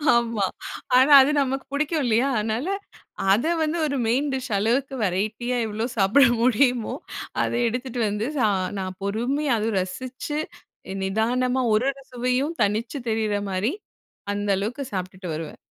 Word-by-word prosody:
ஆமா! 230 -4 +1 0.5
ஆனா 265 +3 +5
அது 270 +3 +3
நமக்கு 270 0 -2
புடிக்கும் 305 +1 0
இல்லையா? 235 +3 +3
அதனால, 220 +7 -1 0.6
அத 220 +8 +3 0.2
வந்து 310 +2 -1
ஒரு 280 -2 -1
மெயின் 260 +6 +1
டிஷ் 260 -2 -4
அளவுக்கு 245 +7 0
வெரைட்டியா 215 +6 -1
எவ்ளோ 220 +2 -2
சாப்பிட 210 +8 +5 0.2
முடியுமோ, 245 -1 +2 0.5
அத - - -1 0.2
எடுத்துட்டு 245 +1 -3
வந்து 210 +3 -2
சா 225 - +3 0.3
நான் 185 -1 -5
பொறுமையா 245 +8 0
அதுவும் 215 -1 0
ரசிச்சு, 255 +10 -5 0.6
நிதானமா 245 +6 +1
ஒரு 215 +4 +2
ஒரு 275 0 -15
சுவையும் 250 +6 0
தனிச்சு 220 +7 -1
தெரிற 220 -2 0
மாரி, 195 - 0 0.6
அந்த 205 0 -2
அளவுக்கு 235 +8 -3
சாப்டுட்டு 185 0 -5
வருவேன். 160 -1 -6
235 Hz, 140 wpm, -24 LUFS, 210-265 Hz, 0.6 s, ஆனா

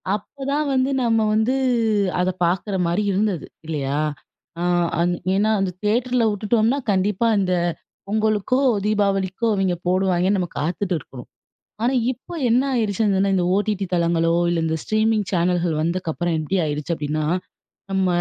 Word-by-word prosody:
அப்பதான் 280 +7 -3
வந்து 260 +1 +2
நம்ம 225 -1 +2
வந்து 220 +4 +2 0.6
அத 180 +1 +2 0.2
பாக்குற 190 +3 -1
மாரி 185 +5 0
இருந்தது. 195 -3 0 0.2
இல்லையா? 145 -2 -2 0.6
அ - - -1 0.4
அண் 175 +1 +2 0.2
ஏன்னா 215 +2 +2
அந்த 195 -1 0
தியேட்டரில 240 +3 +1
விட்டுட்டோம்னா 220 +5 +1
கண்டிப்பா 200 +3 +1
இந்த 185 -2 +1 0.5
பொங்கலுக்கோ, 215 +4 +1 0.3
தீபாவளிக்கோ, 200 0 0
இவைங்க 190 -2 +1
போடுவாய்ங்கன்னு 185 +1 +2
நம்ம 175 -2 -2
காத்துட்டு 180 +4 -1
இருக்ணும். 130 -3 -12 0.5
ஆனா, 250 +3 +2 0.2
இப்ப 260 +7 -10 0.2
என்ன 240 +3 +4
ஆயிருச்சுன்னா 200 -3 +1
இந்த 180 -2 +1
ஓடிடி 205 -1 0
தளங்களோ, 170 -1 +2 0.2
இல்ல 175 -1 0
இந்த 160 - 0
ஸ்ட்ரீமிங் 215 -1 +1
சேனல்கள் 175 -1 +1
வந்தக்கப்புறம் 170 0 -1
எப்டி 155 +5 -1
ஆயிருச்சு 150 +3 -2
அப்டின்னா, 150 +1 -2 0.7
நம்ம 190 -1 +1
195 Hz, 130 wpm, -22 LUFS, 175-215 Hz, 0.7 s, என்ன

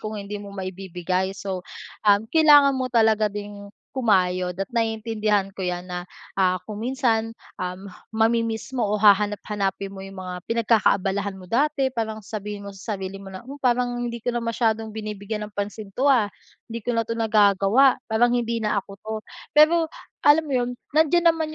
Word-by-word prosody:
kung 215 0 -5
hindi 205 +1 -6
mo 205 - -9
maibibigay. 190 0 -3
So, 190 -2 -4 0.5
um 205 +1 +5
kailangan 295 -3 +7
mo 255 -1 -1
talaga 220 -2 +3
ding 205 0 -7 0.3
kumayod 185 -7 +1
at 195 - -1
naiintindihan 220 -3 0
ko 190 - -6
'yan 180 0 -3
na, 180 -1 -4 0.3
ah, 185 -1 +2
kung 215 0 -6
minsan, 235 -3 0 0.3
um, 180 +2 -5 0.2
mami-miss 225 +2 0
mo 235 -5 0
o 210 - +1
hahanap-hanapin 205 -1 +2
mo 190 - -8
yung 195 0 -10
mga 185 -1 -5 0.2
pinagkakaabalahan 200 -4 +1
mo 185 - -12
dati, 270 +4 +1
parang 220 -2 -2
sabihin 210 -1 -6
mo 200 - -8
sa 195 +1 -5
sarili 195 +1 -6
mo 195 - -9
na, 190 +5 -10
"Oh, 275 - -7
parang 245 -1 +2
hindi 235 -1 -3
ko 240 +2 -3
na 240 - -1
masyadong 225 -1 0
binibigyan 210 0 -5
ng 210 - -16
pansin 205 0 -5
'to, 280 +2 +3
ah. 235 -6 +4 0.4
Hindi 230 -1 -6
ko 245 - -2
na 230 -1 0
'to 230 - -2
nagagawa. 215 +3 +4 0.2
Parang 240 +2 +3
hindi 235 -1 0
na 210 -2 0
ako - - -18
'to." 220 +2 -7 0.4
Pero 320 +2 +6 0.4
alam 295 +2 +7
mo 300 - -9
yun, 245 0 -2 0.2
nandiyan 330 +3 +4
naman 315 -1 -3
215 Hz, 180 wpm, -24 LUFS, 195-235 Hz, 0.5 s, kailangan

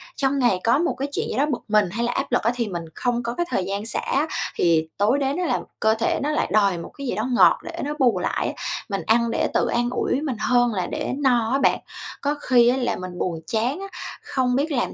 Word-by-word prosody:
trong 275 0 0
ngày 240 -8 +3
có 235 +4 +4
một 345 - +1
cái 275 - -2
chuyện - - -2
gì - - -3
đó 285 - +3
bực 250 - -2
mình 210 -3 +3
hay 230 +5 -2
là 240 - 0
áp - - -3
lực - - +3
á, 230 - +3
thì 235 -3 -1
mình 175 -3 -4
không 245 -1 -1
có 235 0 -2
cái 345 - 0
thời 185 - 0
gian 200 +2 -3
xả 225 - -1
á, 290 +4 0 0.3
thì 160 -2 +2
tối 220 +8 +3
đến 275 +3 0
á 360 - 0
là - - +1 0.2
cơ 220 0 +3
thể 225 +1 0
nó 295 - 0
lại 300 - 0
đòi 200 -4 +3
một 170 - -7
cái 280 -1 -5
gì 215 - -1
đó 220 +4 -1
ngọt 245 - +5
để - - -7
nó 295 +1 -2
bù 250 -3 +3
lại - - -1
á, - - -3 0.4
mình 195 - -2
ăn 230 +1 +3
để - - +1
tự - - +2
an 240 0 0
ủi 255 +2 -1
mình 275 -5 -2
hơn 245 -2 +2
là 185 -2 -1
để 300 -1 -3
no 245 -5 +2
á 275 - +2
bạn. - - +3 0.4
Có 290 +1 0
khi 240 -2 +4
á 255 - +2
là 245 -2 0
mình 180 -1 -7
buồn 170 -3 -2
chán 240 +9 0
á, 390 - -6 0.4
không 255 -2 0
biết 295 +4 0
làm 245 -4 -1
240 Hz, 275 wpm, -23 LUFS, 215-270 Hz, 0.4 s, ngọt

